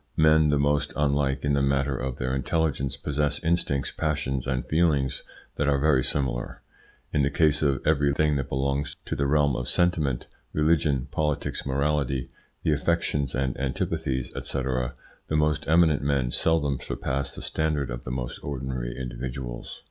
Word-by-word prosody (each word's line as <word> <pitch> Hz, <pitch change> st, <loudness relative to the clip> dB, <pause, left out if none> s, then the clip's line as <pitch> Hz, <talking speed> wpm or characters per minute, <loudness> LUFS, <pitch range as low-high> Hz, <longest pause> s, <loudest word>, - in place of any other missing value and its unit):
Men 80 Hz, -1 st, +5 dB
the 75 Hz, -, +3 dB
most 70 Hz, +1 st, +1 dB
unlike 70 Hz, -2 st, +1 dB
in 70 Hz, -, +2 dB
the 70 Hz, -, +2 dB
matter 70 Hz, 0 st, +1 dB
of 65 Hz, 0 st, -3 dB
their 65 Hz, 0 st, -2 dB
intelligence 70 Hz, 0 st, 0 dB
possess 75 Hz, 0 st, 0 dB
instincts, 80 Hz, -4 st, 0 dB
passions, 70 Hz, -4 st, -1 dB
and 65 Hz, -1 st, -1 dB
feelings 75 Hz, -5 st, +1 dB, 0.4 s
that 70 Hz, -, +1 dB
are 70 Hz, -1 st, +3 dB
very 70 Hz, -2 st, +3 dB
similar. 65 Hz, -4 st, -2 dB, 0.5 s
In 75 Hz, -, +3 dB
the 70 Hz, -, +3 dB
case 75 Hz, 0 st, +2 dB
of 70 Hz, -3 st, +1 dB
every 75 Hz, -2 st, +3 dB
thing 75 Hz, +1 st, +2 dB
that 70 Hz, 0 st, -3 dB
belongs 70 Hz, +2 st, -1 dB
to -, -, -2 dB
the 70 Hz, -, 0 dB
realm 70 Hz, -2 st, +3 dB
of 65 Hz, 0 st, -3 dB
sentiment 80 Hz, -8 st, +1 dB, 0.3 s
religion, 75 Hz, -4 st, +2 dB
politics, 75 Hz, -3 st, -1 dB
morality, 70 Hz, -1 st, 0 dB, 0.3 s
the 80 Hz, -, +3 dB
affections 75 Hz, -3 st, 0 dB
and 65 Hz, -1 st, 0 dB
antipathies, 65 Hz, -1 st, -2 dB
&c. 70 Hz, -, -3 dB
the 65 Hz, +3 st, -4 dB
most 75 Hz, 0 st, +1 dB
eminent 80 Hz, -2 st, +4 dB
men 70 Hz, -3 st, +1 dB
seldom 75 Hz, -4 st, +1 dB
surpass 70 Hz, +1 st, -3 dB
the -, -, -8 dB
standard 75 Hz, -4 st, -1 dB
of -, -, -5 dB
the -, -, -6 dB
most 65 Hz, -1 st, -4 dB
ordinary 65 Hz, -3 st, -4 dB
individuals. 60 Hz, -1 st, -5 dB
70 Hz, 160 wpm, -26 LUFS, 65-75 Hz, 0.5 s, Men